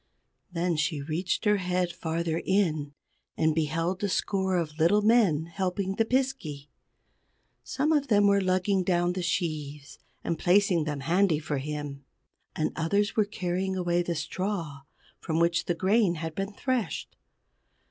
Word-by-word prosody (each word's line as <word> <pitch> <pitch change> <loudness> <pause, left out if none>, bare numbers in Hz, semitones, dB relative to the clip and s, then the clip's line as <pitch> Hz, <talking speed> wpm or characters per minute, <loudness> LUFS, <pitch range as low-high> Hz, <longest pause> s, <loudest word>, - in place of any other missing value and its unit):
Then 175 -1 0
she 155 0 0
reached 165 +8 -2
her 210 0 +4
head 180 -1 -1
farther 165 0 -2
in, 155 -7 0 0.4
and 160 0 +2
beheld 165 +5 -1
a 200 - +1
score 190 -1 0
of 155 -2 -3
little 205 +6 +4
men 205 -9 +4
helping 185 +2 -2
the 225 - +2
Piskey. 225 - -2 0.9
Some 295 +3 0
of 290 -3 +2
them 205 -3 +4
were 200 0 +4
lugging 185 +1 +1
down 175 -1 +1
the 185 - -3
sheaves, 150 -5 -3 0.2
and 165 -2 -2
placing 180 -3 +3
them 145 -2 -3
handy 170 +3 +2
for 150 -2 -3
him; 145 -1 -5 0.5
and 155 - 0
others 200 +6 0
were 215 - +3
carrying 190 -1 -2
away 175 -1 +1
the 175 -1 -2
straw 165 -2 -3 0.4
from 160 -2 -2
which 170 0 +2
the 175 - 0
grain 190 +1 +2
had 160 0 -5
been 195 +4 -3
threshed. 250 +1 -2
175 Hz, 150 wpm, -28 LUFS, 160-195 Hz, 0.9 s, her